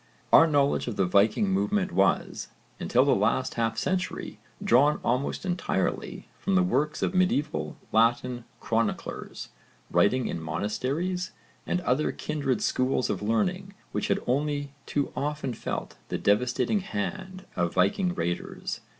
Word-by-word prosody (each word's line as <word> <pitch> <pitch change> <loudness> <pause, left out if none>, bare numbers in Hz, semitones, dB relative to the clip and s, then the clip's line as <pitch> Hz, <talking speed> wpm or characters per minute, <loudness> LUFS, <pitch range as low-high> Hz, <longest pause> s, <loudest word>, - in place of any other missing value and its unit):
Our 165 - +9
knowledge 145 -4 +2
of 120 - -3
the 95 - +2
Viking 100 - +3
movement 200 -1 +1
was, 95 0 +1 0.3
until 125 +2 +3
the 140 - +4
last 115 +6 +1
half 115 -1 -1
century, 185 +7 -2 0.2
drawn 145 +5 +4
almost 125 +9 -1
entirely 180 -1 -2
from 195 - 0
the 185 - +5
works 155 -4 0
of - - 0
medieval 145 - 0
Latin 120 +2 +2
chroniclers, 115 -1 -2 0.4
writing 125 +5 +3
in 85 - -3
monasteries 130 - -2 0.3
and 180 - 0
other 155 -3 +1
kindred 140 -6 -2
schools 130 0 +1
of - - -3
learning 180 - -1 0.2
which - - -1
had - - +2
only 145 +2 0 0.2
too 145 -1 -1
often 145 -3 -2
felt - - -5
the - - -1
devastating 125 - +2
hand 190 -1 -5
of 85 -1 -1
Viking 175 - +2
raiders. 85 +1 -3
140 Hz, 135 wpm, -27 LUFS, 115-180 Hz, 0.4 s, Our